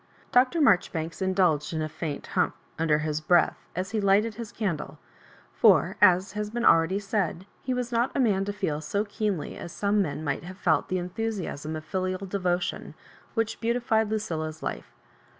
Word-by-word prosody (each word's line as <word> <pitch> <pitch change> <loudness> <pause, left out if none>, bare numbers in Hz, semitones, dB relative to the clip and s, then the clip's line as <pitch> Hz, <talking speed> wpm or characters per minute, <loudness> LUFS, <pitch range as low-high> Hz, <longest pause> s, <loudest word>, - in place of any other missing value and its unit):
Dr. 260 +6 +4
Marjoribanks 170 - +2
indulged 180 -6 +2
in 160 - -1
a - - -1
faint 155 -1 -5
^ - - -12
humph," - - +1 0.2
under 160 -2 +3
his 155 0 -1
breath, 175 +2 +3 0.2
as 185 +2 -3
he 220 -2 0
lighted 205 +3 +3
his 225 0 -7
candle; 190 -9 -3 0.6
for, - - +4
as 185 +1 +5
has 210 +1 -3
been 240 +2 -2
already 165 +4 +5
said, 195 -3 -2 0.2
he 260 - -3
was 250 -1 -2
not 235 +2 +1
a - - +1
man 205 -7 +3
to 205 - -2
feel 155 -7 -2
BO 205 +1 +2
keenly 205 -5 -2
as 170 - -7
some 205 +3 +1
men 155 -3 -3
might 140 0 -2
have 185 +2 -9
felt 170 -5 +2
the 185 - 0
enthu 180 +5 -3
siasm 160 -7 -4
of 155 - -9
filial 185 +1 -2
devotion 180 -2 -2 0.4
which 225 -1 -1
beautified 230 -2 +1
Lucilla's 160 -8 -3
life. - - -5
190 Hz, 185 wpm, -27 LUFS, 165-215 Hz, 0.6 s, as